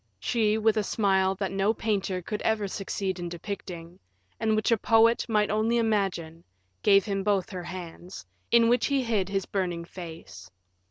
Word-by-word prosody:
She, 220 -2 +1
with 220 0 +2
a 215 - +2
smile 190 -2 +1
that 195 0 -3
no 195 +3 +1
painter 195 -5 -1
could 210 +4 -4
ever 215 -2 0
succeed 190 -1 -3
in 175 0 -4
depicting, 175 -1 -7 0.4
and 220 -1 +1
which 215 +2 +1
a 230 - +5
poet 225 +2 +3
might 210 -2 +2
only 220 +2 +1
imagine, 195 -7 -1 0.4
gave 200 -1 +5
him 195 -2 -2
both 200 -2 0
her 180 -2 -6
hands, 175 - -8 0.2
in 235 -1 +5
which 240 0 +3
he 275 -2 +1
hid 210 -5 0
his 195 -1 -1
burning 175 -4 -2
face. 165 - -10
200 Hz, 170 wpm, -27 LUFS, 185-220 Hz, 0.4 s, a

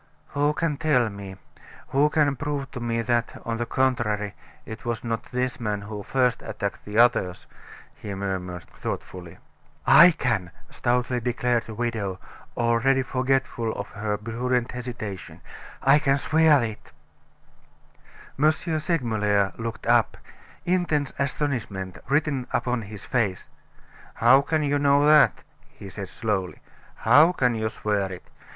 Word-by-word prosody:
"Who 145 +1 +1
can 150 -3 -1
tell 130 -7 +2
me 100 -2 -8 0.5
who 140 +3 +3
can 150 -2 +2
prove 140 0 -4
to 125 - -6
me 115 -1 -1
that, 120 0 -1
on 115 0 -2
the 120 0 -3
contrary, 115 -6 0 0.3
it 110 - -8
was 120 -2 -3
not 115 -1 -3
this 125 0 -2
man 105 -3 -2
who 105 0 -7
first 125 +3 +1
attacked - - -5
the 105 +1 -5
others?" 95 -7 +3 0.5
he 100 -2 -7
murmured, 90 -3 -4
thoughtfully. 90 -3 -7 0.5
"I 160 +6 +9
can," 110 - -1 0.2
stoutly 125 0 0
declared 120 0 0
the 110 - -7
widow, 110 -5 -2 0.4
already 120 +3 +2
forgetful 130 -3 -1
of 100 - -6
her 105 -1 -3
prudent 120 +3 -1
hesitation, 120 -6 -7 0.4
"I 135 +2 +6
can 140 -2 +2
swear 155 -2 +4
it." 110 -2 -6 1.5
M. 155 +2 +5
Segmuller 120 - 0
looked 115 0 -6
up, - - +3 0.5
intense 170 -6 0
astonishment 120 -10 -3
written 140 -3 0
upon 125 -1 -1
his 105 -1 -9
face. 105 -8 -1 0.7
"How 125 +4 +6
can 155 +2 0
you 145 0 +1
know 140 0 +4
that?" 150 0 +5 0.3
he 100 - -11
said 100 -1 -7
slowly. 100 -6 -2 0.4
"How 150 +10 +5
can 125 -7 +1
you 110 -1 -1
swear 100 -3 -2
it? 90 - -9
120 Hz, 135 wpm, -25 LUFS, 105-140 Hz, 1.5 s, I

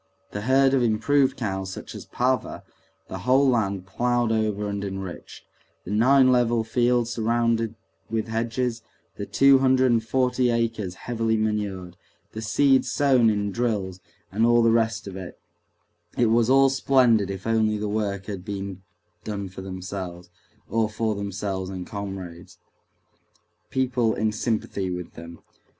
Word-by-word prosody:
The 105 - -4
herd 135 +3 +3
of 135 - +3
improved 125 +5 +2
cows 95 -4 -3
such - - -8
as - - -9
Pava, 130 +1 -1 0.4
the 95 - -6
whole 130 +7 +3
land 100 -7 0
ploughed 120 +3 0
over 105 -2 0
and 100 0 -3
enriched, 95 -2 -7 0.4
the 95 - -6
nine 130 +4 +5
level 120 -2 +2
fields 120 +1 +1
surrounded 115 -1 0 0.3
with 115 -1 -2
hedges, 115 +1 -2 0.4
the - - -5
two 135 0 +5
hundred 130 -1 +3
and 115 -1 +2
forty 125 +1 +1
acres 115 -5 -1
heavily 115 -2 0
manured, 100 -5 -2 0.3
the 110 - -6
seed 135 +5 +3
sown 130 -5 +3
in 105 -1 -1
drills, 100 -5 -2 0.3
and 105 +4 0
all 120 0 +5
the 115 - +4
rest 115 -1 +1
of 100 -2 -7
it—it 95 +5 -7
was 115 +1 +3
all 135 +1 +6
splendid 125 -6 +3
if 95 -1 -6
only 110 -1 +1
the 105 0 -3
work 100 -2 -2
had 100 -4 -6
been 100 -2 -6 0.4
done 100 -3 -4
for 95 - -9
themselves, 95 -2 -7 0.4
or 110 +1 0
for 110 0 -1
themselves 100 -2 -4
and 90 -2 -6
comrades—people 100 +6 -6
in 110 +1 0
sympathy 105 -4 -2
with 90 -1 -6
them. 85 0 -11
110 Hz, 145 wpm, -24 LUFS, 100-120 Hz, 0.4 s, all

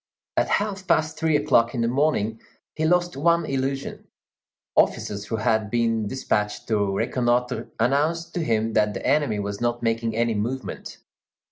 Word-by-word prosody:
At - - +1
half 200 -2 -4
past 155 0 +1
three 160 -1 +2
o'clock 135 -5 +3
in 120 - 0
the 115 - +2
morning, 120 -5 0 0.3
he 160 - -1
lost 175 -1 +2
one 170 +3 +2
illusion; 135 0 -3 0.7
officers 100 -1 +1
who 115 - -3
had 110 -1 +1
been 115 -2 +1
despatched 105 -3 -2
to 100 -3 +1
reconnoitre 125 0 0
announced 155 +8 +1
to 175 - -1
him 110 -3 0
that 105 -1 +2
the - - -5
enemy 145 -8 +2
was 100 +1 -4
not 120 0 -1
making 115 -1 0
any 115 0 +1
movement. 120 +5 -4
120 Hz, 155 wpm, -24 LUFS, 110-150 Hz, 0.7 s, o'clock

